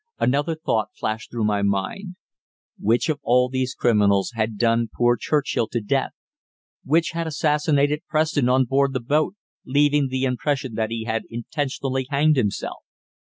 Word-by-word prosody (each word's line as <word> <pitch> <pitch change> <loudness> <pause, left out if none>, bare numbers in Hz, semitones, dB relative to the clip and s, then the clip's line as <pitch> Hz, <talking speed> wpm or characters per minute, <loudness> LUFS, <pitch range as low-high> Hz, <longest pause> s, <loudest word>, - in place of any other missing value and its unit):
Another 145 +5 +1
thought 115 -8 -1
flashed 110 +1 -3
through 115 -2 -3
my 105 -1 +1
mind. 100 - -2 0.6
Which 115 +4 +1
of 155 -3 -1
all 125 -1 +3
these 130 0 -2
criminals 105 -4 +2
had 110 -1 -2
done 115 0 +2
poor 120 0 +2
Churchill 135 -1 0
to 120 - -2
death? 105 - -1 0.7
Which 165 +4 +2
had 165 -1 -3
assassinated 150 -1 +1
Preston 155 -4 +1
on 130 +1 +3
board 135 +2 +1
the 130 - -1
boat, 150 - 0 0.3
leaving 145 +1 +2
the 130 0 -2
impression 130 0 -1
that 110 0 -1
he 115 0 -3
had 110 -1 -2
intentionally 130 +1 -3
hanged 150 +2 +3
himself? 110 -7 -2
130 Hz, 155 wpm, -23 LUFS, 115-145 Hz, 0.7 s, all